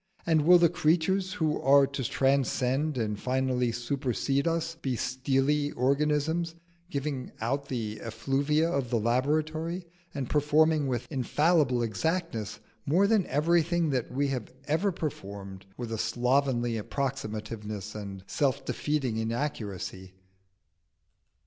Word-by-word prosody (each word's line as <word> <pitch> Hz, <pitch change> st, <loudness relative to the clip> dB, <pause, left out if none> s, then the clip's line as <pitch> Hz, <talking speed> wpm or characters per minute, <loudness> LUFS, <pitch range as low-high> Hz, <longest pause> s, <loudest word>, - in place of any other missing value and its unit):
and 160 Hz, -2 st, +2 dB
will 180 Hz, 0 st, +9 dB
the 170 Hz, -1 st, +5 dB
creatures 175 Hz, +4 st, +1 dB
who 160 Hz, -6 st, 0 dB
are 140 Hz, +1 st, +6 dB
to 140 Hz, 0 st, -4 dB
transcend 135 Hz, +2 st, +1 dB
and 105 Hz, -3 st, -1 dB
finally 125 Hz, -1 st, 0 dB
supersede 135 Hz, +3 st, -1 dB
us 165 Hz, 0 st, 0 dB
be 135 Hz, -6 st, -3 dB
steely 135 Hz, +4 st, +1 dB
organisms, 150 Hz, +5 st, +1 dB, 0.3 s
giving 140 Hz, -4 st, -3 dB
out 140 Hz, +5 st, -1 dB
the 110 Hz, -5 st, -3 dB
effluvia 140 Hz, +7 st, 0 dB
of 140 Hz, -7 st, -1 dB
the 120 Hz, -, +1 dB
laboratory, 155 Hz, -, 0 dB, 0.3 s
and 135 Hz, -3 st, -2 dB
performing 150 Hz, +1 st, +3 dB
with 125 Hz, -2 st, -2 dB
infallible 140 Hz, -1 st, +2 dB
exactness 115 Hz, -, -2 dB, 0.2 s
more 175 Hz, -, +3 dB
than 205 Hz, -3 st, +3 dB
everything 165 Hz, +2 st, +2 dB
that 125 Hz, -4 st, -1 dB
we 140 Hz, +2 st, 0 dB
have 125 Hz, -5 st, -3 dB, 0.5 s
performed 100 Hz, -9 st, -6 dB
with 120 Hz, -2 st, -5 dB
a 110 Hz, -, -3 dB
slovenly 125 Hz, -2 st, +1 dB
approximativeness 110 Hz, -5 st, -4 dB
and 100 Hz, -3 st, -7 dB
self 135 Hz, +4 st, 0 dB
defeating 135 Hz, -7 st, -1 dB
inaccuracy?" 110 Hz, -6 st, -4 dB
135 Hz, 115 wpm, -28 LUFS, 120-155 Hz, 0.5 s, will